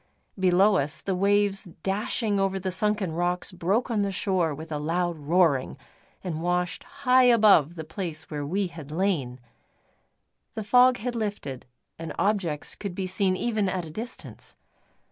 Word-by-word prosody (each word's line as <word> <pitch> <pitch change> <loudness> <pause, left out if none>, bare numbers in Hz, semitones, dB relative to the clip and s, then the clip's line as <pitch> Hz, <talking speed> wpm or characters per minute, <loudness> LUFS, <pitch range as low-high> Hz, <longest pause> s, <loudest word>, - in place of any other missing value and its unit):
Below 190 +2 +4
us, 140 -1 -2
the 195 - -2
waves 200 +1 +2 0.2
dashing 210 +1 0
over 195 0 0
the 185 0 -3
sunken 210 -1 0
rocks 175 +4 -1
broke 195 +8 0
on 215 -3 +1
the 200 -1 0
shore 185 -4 0
with 160 +3 -8
a 150 - -2
loud 170 +3 -1
roaring, 150 -3 +2 0.5
and 165 -4 -4
washed 180 0 -1
high 260 -2 +3
above 210 - +5
the 160 - -5
place 160 -1 -5
where 145 -1 -3
we 190 +8 -1
had 165 -5 -9
lain. 155 -7 -1 1.2
The 220 - -3
fog 250 +4 +5
had 245 +2 -4
lifted, 205 - -4 0.3
and 165 -1 -5
objects 190 -8 0
could 200 -4 -6
be 190 -1 -2
seen 185 0 +1
even 215 -4 0
at 185 -2 -2
a 155 - -9
distance. 230 +8 -8
185 Hz, 160 wpm, -26 LUFS, 165-205 Hz, 1.2 s, above